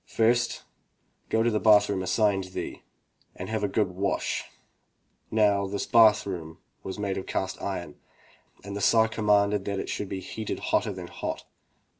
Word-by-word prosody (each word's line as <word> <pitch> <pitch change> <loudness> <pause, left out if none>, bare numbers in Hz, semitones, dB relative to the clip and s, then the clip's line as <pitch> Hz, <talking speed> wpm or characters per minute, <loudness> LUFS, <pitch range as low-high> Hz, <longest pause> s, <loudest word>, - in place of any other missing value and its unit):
"First 120 +1 +1 0.7
go 110 - +2
to 120 - +2
the 105 - +1
bath 105 -2 +6
room 100 -2 -1
assigned 95 +1 +1
thee, 95 - -6 0.5
and - - -7
have 110 -1 -2
a - - +2
good 100 -1 0
wash,'' 95 +2 -1
he - - -13 0.9
ordered. 110 -1 +5
Now 100 -1 +2
this 100 +1 -3
bath 110 -3 +5
room 80 -5 -6 0.2
was 95 - -6
made 100 -2 -2
of 95 - -9
cast 95 - -3
iron, 85 -6 -5 0.6
and 100 0 -6
the 100 - -4
Tsar 110 +1 +5
commanded 105 -2 +2
that 100 -1 -2
it - - -5
should 100 - -3
be 95 - -3
heated 110 +3 -5 0.2
hotter - - +2
than - - -7
hot. - - -5
100 Hz, 180 wpm, -27 LUFS, 95-110 Hz, 0.9 s, bath